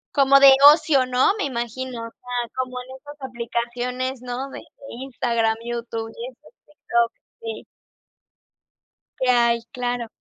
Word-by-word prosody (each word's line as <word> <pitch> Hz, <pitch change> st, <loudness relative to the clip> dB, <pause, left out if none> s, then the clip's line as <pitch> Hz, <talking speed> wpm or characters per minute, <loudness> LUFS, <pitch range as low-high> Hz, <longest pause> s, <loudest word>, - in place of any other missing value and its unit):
Como 275 Hz, 0 st, +6 dB
de 275 Hz, -1 st, +9 dB, 0.2 s
ocio, 285 Hz, -5 st, +2 dB
¿no?, 255 Hz, +9 st, +3 dB
me 405 Hz, -, -2 dB
imagino, 245 Hz, -1 st, -4 dB
o -, -, -10 dB
sea, 245 Hz, 0 st, -5 dB
como 255 Hz, -1 st, -3 dB
en 250 Hz, -, -10 dB
esas 290 Hz, +2 st, -13 dB
aplicaciones, 245 Hz, +1 st, -4 dB
¿no?, 250 Hz, +2 st, -5 dB
de -, -, -9 dB, 0.3 s
Instagram, 235 Hz, -3 st, -1 dB
YouTube 230 Hz, -1 st, -4 dB
y, 235 Hz, -, -5 dB
esas, 290 Hz, -, -22 dB
TikTok. 235 Hz, -5 st, -1 dB, 0.3 s
Sí. 225 Hz, -1 st, -6 dB, 1.6 s
Que 255 Hz, -1 st, +1 dB
hay, 235 Hz, -1 st, +3 dB
claro. 245 Hz, -1 st, -3 dB
245 Hz, 135 wpm, -22 LUFS, 235-260 Hz, 1.6 s, de